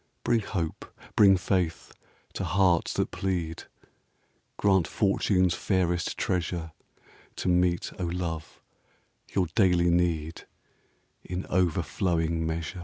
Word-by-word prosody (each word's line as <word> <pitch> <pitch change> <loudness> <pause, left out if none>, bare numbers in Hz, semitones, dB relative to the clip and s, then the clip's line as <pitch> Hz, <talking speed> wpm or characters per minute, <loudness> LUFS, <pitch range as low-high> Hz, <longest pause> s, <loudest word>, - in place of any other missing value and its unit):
Bring 120 - +3
hope, 90 -6 -5 0.2
bring 100 -2 +6
faith, 90 -3 -1 0.4
to - - -4
hearts 90 -3 +2
that - - -1
plead! 90 -3 -3 0.9
Grant 95 -4 +3
fortune's 95 -3 +2
fairest 90 -2 0
treasure 85 -2 -2 0.6
To - - -4
meet, 90 -1 +2
O 90 - -1
love, 85 -2 -4 0.7
your 95 -2 +3
daily 90 -4 +3
need 85 -2 0 0.8
In 90 +1 -5
over 90 -3 +2
flowing 80 -2 -1
measure. 80 +3 -4
90 Hz, 110 wpm, -27 LUFS, 85-95 Hz, 0.9 s, bring